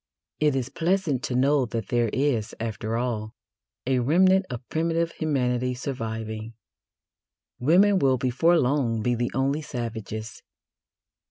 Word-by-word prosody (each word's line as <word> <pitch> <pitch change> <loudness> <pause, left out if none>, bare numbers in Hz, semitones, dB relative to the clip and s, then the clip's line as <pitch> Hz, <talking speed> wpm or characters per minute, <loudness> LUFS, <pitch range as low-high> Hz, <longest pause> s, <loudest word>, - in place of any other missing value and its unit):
It 150 -2 +2
is 130 -1 -2
pleasant 165 -5 0
to 125 - -2
know 135 0 +3
that 115 -3 -4
there 120 -1 +2
is, 130 -6 0
after 110 0 -3
all, 110 -3 -3 0.5
a 130 0 +2
remnant 185 +8 +4
of 125 -1 -7
primitive 165 +1 0
humanity 125 -5 -1
surviving. 115 -3 -5 1.0
Women 190 +9 +4
will 135 -4 +3
before 135 +8 +2
long 125 -6 +1
be 125 - +1
the 120 0 -1
only 140 +3 +1
savages. 115 -5 -6
125 Hz, 125 wpm, -25 LUFS, 115-150 Hz, 1.0 s, remnant